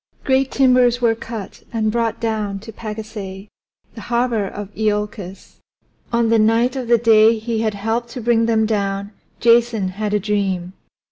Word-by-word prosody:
Great 265 0 +2
timbers 250 -2 +3
were 235 -2 +3
cut 225 -3 -8
and 220 -2 0
brought 230 -1 -1
down 215 -3 -2
to 220 +3 -10
Pagasae, 210 -3 -7 0.4
the - - -9
harbor 235 -4 0
of 205 +1 -8
Iolcus. 210 -3 -3 0.5
On 235 -1 +2
the 230 0 +4
night 230 +4 +3
of 255 -3 -4
the 235 0 +5
day 225 0 +5
he 220 0 -2
had 215 -2 -1
helped 225 +4 -2
to 250 - -7
bring 230 0 +2
them 220 -1 +2
down 200 -2 -2 0.3
Jason 230 -4 +3
had 210 +2 -2
a - - +2
dream. 190 -3 -2
220 Hz, 160 wpm, -20 LUFS, 205-235 Hz, 0.5 s, the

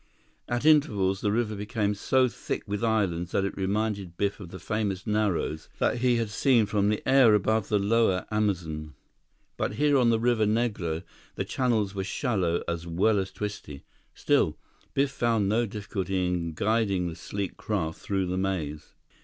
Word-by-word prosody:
At 120 +3 -1
intervals, 105 -12 +3
the 105 - +1
river 110 -1 0
became 105 0 -1
so 130 +5 +2
thick - - -4
with 105 +2 -3
islands 95 -7 0
that 100 - +2
it 100 - -3
reminded 100 -2 -2
Biff 100 +1 -1
of 95 -4 -9
the 95 - -8
famous 100 -3 -2
Narrows 105 -7 -1
that - - +1
he 125 0 +3
had 115 -3 -1
seen 120 0 +3
from 100 0 +1
the 105 - -2
air 130 -5 +6
above 110 +1 +1
the 105 - +3
lower 100 -2 +2
Amazon. 85 -8 -2 0.6
But - - -1
here 145 +2 +3
on 120 -2 +4
the 115 -1 +3
Rio 120 +1 +2
Negro, 105 -7 -1 0.3
the - - -2
channels 110 -6 0
were 95 -1 -3
shallow 95 - -1
as 85 0 -3
well 100 +5 +2
as 95 0 -3
twisty. 100 -9 -6 0.3
Still, - - +2 0.4
Biff 140 0 +2
found 115 -5 +1
no 115 +3 +1
difficulty 95 -3 -2
in 85 -2 -2
guiding 100 -3 +1
the 85 - -5
sleek 100 +1 -5
craft 85 -7 -3
through 95 -2 -1
the 90 +1 -2
maze. 80 -6 -3
105 Hz, 170 wpm, -27 LUFS, 95-115 Hz, 0.6 s, air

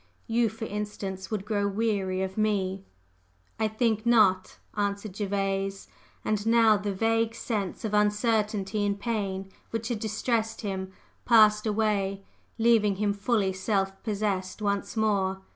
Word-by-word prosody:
You, 230 0 +2
for 225 +2 -6
instance, 200 -2 -5
would 210 -3 -3
grow 205 -2 0
weary 195 -3 0
of 190 0 -4
me!" 195 -3 0 0.8
"I 220 - +2
think 220 0 0
not," 210 -6 +3 0.2
answered 200 -1 -2
Gervase. 195 - -2 0.4
And 210 -1 0
now 225 -2 +6
the 205 0 -2
vague 225 +3 +1
sense 215 -3 -3
of 210 - -3
uncertainty 210 -1 +1
and 200 0 0
pain 195 -4 -3 0.2
which 225 0 -3
had 235 -3 -2
distressed 225 +1 -1
him 190 -3 -4 0.3
passed 215 -2 +5
away, 205 -2 0 0.3
leaving 225 -3 +4
him 205 +1 0
fully 200 -2 0
self 195 0 -1
possessed 200 -4 -2
once 200 +1 -2
more. 195 -3 +1
210 Hz, 135 wpm, -27 LUFS, 195-220 Hz, 0.8 s, now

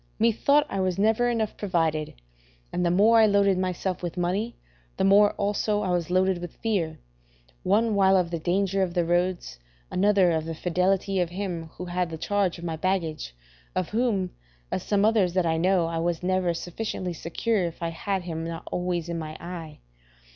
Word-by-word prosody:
Methought 235 +6 +3
I 195 - -3
was 185 -2 0
never 220 +4 +3
enough 225 -3 -1
provided: 165 -6 -1 0.6
and 180 - 0
the 175 - +2
more 210 +6 +5
I 220 - +6
loaded 200 -2 +3
myself 185 0 -2
with 175 0 -5
money, 195 +7 -1 0.4
the - - 0
more 205 +2 +5
also 205 +1 0
was 180 -4 -1
I - - -2
loaded 185 -1 +2
with 175 -1 -8
fear, 195 -8 -1 0.6
one 215 +3 +2
while 195 -1 +4
of 175 -2 0
the 170 - -2
danger 195 +3 0
of 180 -2 -1
the 175 -1 +2
roads, 175 - -1 0.3
another 195 -2 +3
of 160 -1 -1
the 165 0 -4
fidelity 185 +3 0
of 175 -2 0
him 180 -3 -4
who 180 - -6
had 180 0 -1
the 160 - -6
charge 195 +1 0
of 170 - -10
my 165 -2 -3
baggage, 160 - -2 0.4
of 185 -2 -1
whom, 215 -5 0 0.4
as - - -1
some 205 0 +1
others 210 -5 +3
that 185 -2 +2
I 160 -1 +1
know, 180 +1 +2
I 165 0 -2
was 170 0 -1
never 185 -2 +1
sufficiently 180 0 -4
secure 190 +6 -1
if 170 0 -6
I 165 - 0
had 190 +3 -3
him 165 -2 -4
not 165 0 -5
always 175 -2 -2
in 170 -1 -3
my 155 -1 -6
eye. 165 -3 -8
180 Hz, 190 wpm, -26 LUFS, 170-200 Hz, 0.6 s, I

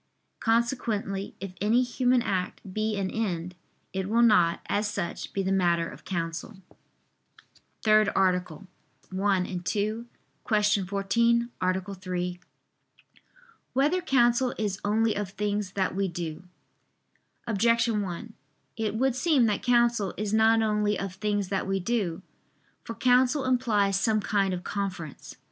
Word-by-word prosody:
Consequently 225 -4 -1
if 190 0 -6
any 225 +5 +3
human 250 0 +2
act 185 -5 -2
be 215 0 -1
an 190 -1 -2
end, 180 -5 -2 0.4
it 190 0 -2
will 230 +2 +4
not, 180 -7 +4
as 205 +1 0
such, 205 -4 -4
be 195 - -1
the 190 - -1
matter 175 -3 +2
of - - -12
counsel. 170 +3 -4 0.2
________________________ - - -32 1.1
THIRD 215 -1 +5
ARTICLE 180 -1 0 0.5
[I 195 -1 +2
II, 180 -1 -4
Q. 215 +5 -2 0.8
14, 235 +5 +1
Art. 185 0 0 0.2
3] 180 -1 -3 1.3
Whether 295 +8 +2
Counsel 250 -4 +2
Is 205 -3 -2
Only 220 +2 +2
of 205 -2 -3
Things 205 -1 -2
That 190 -2 0
We 195 0 0
Do? 170 -1 -5 1.0
Objection 230 0 +2
1: 200 +4 -6 0.4
It 220 -2 -2
would 260 +2 +1
seem 280 -3 +3
that 210 -3 0
counsel 235 -5 +2
is 210 0 -2
not 225 +1 +4
only 210 -1 +1
of 195 -2 -4
things 205 0 -1
that 195 -1 -1
we 195 0 0
do. 190 -4 -2 0.6
For 230 - -7
counsel 255 +4 +3
implies 210 -6 +2
some 215 +1 +2
kind 200 -2 +1
of 180 -1 -4
conference. 185 -7 -5
205 Hz, 135 wpm, -27 LUFS, 190-230 Hz, 1.3 s, THIRD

